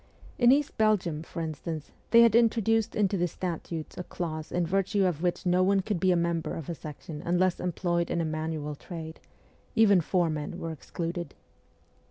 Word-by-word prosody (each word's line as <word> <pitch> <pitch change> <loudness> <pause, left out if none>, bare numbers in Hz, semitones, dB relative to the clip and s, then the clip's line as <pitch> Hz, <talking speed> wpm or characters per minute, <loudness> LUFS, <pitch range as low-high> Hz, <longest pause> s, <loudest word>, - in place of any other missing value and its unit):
In 240 0 +7
East 285 -2 +1
Belgium, 190 -8 +2
for 165 0 -5
instance, 155 -1 -5 0.2
they 235 - +7
had 230 -2 +5
introduced 225 -1 +3
into 200 -1 +2
the 175 0 +1
statutes 165 -2 -5
a - - -3
clause 155 -3 -5
in 175 -1 +1
virtue 195 +3 +1
of 170 -4 0
which 175 +1 -1
no 180 +1 +3
one 195 +1 +3
could 200 -2 -2
be 185 - +2
a - - +4
member 170 -1 -1
of 165 -2 -6
a - - -1
section 150 0 -8
unless 180 +1 +1
employed 175 -1 -1
in - - 0
a 165 - 0
manual 155 -1 -3
trade; 160 +1 -8 0.6
even 205 -5 +6
fore 175 0 +1
men 150 -1 -4
were 165 - -4
excluded. 170 +1 -5
175 Hz, 185 wpm, -28 LUFS, 160-195 Hz, 0.6 s, In